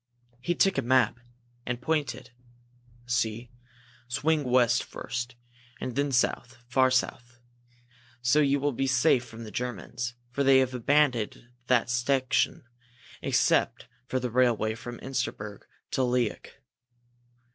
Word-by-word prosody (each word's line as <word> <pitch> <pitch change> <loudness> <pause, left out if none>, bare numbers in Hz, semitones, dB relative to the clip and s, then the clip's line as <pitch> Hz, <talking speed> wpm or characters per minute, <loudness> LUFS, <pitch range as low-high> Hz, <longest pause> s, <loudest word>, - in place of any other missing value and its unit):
He 175 +7 -1
took 195 -5 +3
a - - +1
map 125 -1 +2 0.4
and 120 -1 -3
pointed. 130 -3 -2 0.7
"See 120 -1 -1 0.6
swing 150 +5 +1
west 125 -1 +3
first, 120 +2 -5 0.4
and 125 - -4
then 140 0 0
south 125 0 0
far 130 +1 +3
south. 125 -1 -1 0.9
So 125 +5 +4
you 140 -1 +3
will 145 +1 +1
be 135 +1 -1
safe 130 -1 +3
from 115 -1 -10
the 110 - -9
Germans, 120 +1 -4 0.2
for 140 +3 0
they 135 -1 +6
have 130 -1 +2
abandoned 125 -3 +1 0.2
that 120 -2 +3
section 125 +2 +1 0.6
except - - +1 0.2
for 130 - -1
the 125 -1 -3
railway 120 -3 +2
from 120 +2 -8
Insterberg 120 -6 -4 0.3
to - - 0
Liok. 125 -3 0
125 Hz, 125 wpm, -28 LUFS, 120-130 Hz, 0.9 s, they